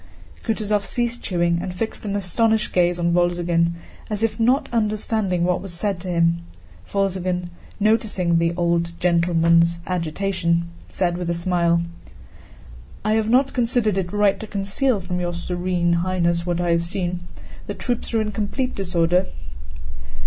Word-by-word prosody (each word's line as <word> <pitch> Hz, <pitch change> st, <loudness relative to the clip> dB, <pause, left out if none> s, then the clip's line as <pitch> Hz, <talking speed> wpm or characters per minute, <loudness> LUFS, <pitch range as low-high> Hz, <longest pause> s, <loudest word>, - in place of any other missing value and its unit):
Kutúzov 210 Hz, -2 st, 0 dB
ceased 240 Hz, -1 st, -1 dB
chewing 170 Hz, -2 st, +1 dB
and 185 Hz, -, -4 dB
fixed 220 Hz, +5 st, -3 dB
an 200 Hz, -1 st, -2 dB
astonished 215 Hz, +3 st, +1 dB
gaze 175 Hz, -1 st, +3 dB
on 170 Hz, -1 st, +1 dB
Wolzogen, 175 Hz, -1 st, +2 dB, 0.3 s
as 210 Hz, 0 st, -2 dB
if 225 Hz, +1 st, 0 dB
not 260 Hz, +5 st, +3 dB
understanding 215 Hz, -4 st, 0 dB
what 180 Hz, 0 st, +1 dB
was 185 Hz, -2 st, -7 dB
said 195 Hz, +1 st, -1 dB
to 185 Hz, -, -8 dB
him. 170 Hz, -1 st, +2 dB, 0.5 s
Wolzogen, 185 Hz, -3 st, -1 dB, 0.3 s
noticing 205 Hz, -5 st, +2 dB
"the 165 Hz, 0 st, +2 dB
old 170 Hz, -1 st, 0 dB
gentleman's" 170 Hz, -1 st, +3 dB
agitation, 170 Hz, -1 st, 0 dB, 0.2 s
said 175 Hz, -1 st, -1 dB
with 175 Hz, -1 st, -3 dB
a 170 Hz, -, 0 dB
smile: 170 Hz, -1 st, +1 dB, 1.2 s
"I 215 Hz, -, +3 dB
have 220 Hz, 0 st, +1 dB
not 260 Hz, +3 st, +3 dB
considered 235 Hz, -4 st, +1 dB
it 175 Hz, -2 st, -3 dB
right 205 Hz, -1 st, +2 dB
to 220 Hz, -, -6 dB
conceal 200 Hz, +4 st, 0 dB
from 180 Hz, 0 st, -3 dB
your 175 Hz, -1 st, -2 dB
Serene 175 Hz, 0 st, 0 dB
Highness 170 Hz, -1 st, +1 dB
what 175 Hz, -1 st, 0 dB
I 175 Hz, -1 st, +1 dB
have 170 Hz, 0 st, +2 dB
seen. 175 Hz, 0 st, -2 dB, 0.5 s
The -, -, -4 dB
troops 245 Hz, -2 st, -2 dB
are 225 Hz, -, +3 dB
in 210 Hz, -1 st, -2 dB
complete 220 Hz, +5 st, -2 dB
disorder...." 175 Hz, -1 st, +1 dB
180 Hz, 150 wpm, -22 LUFS, 170-210 Hz, 1.2 s, gaze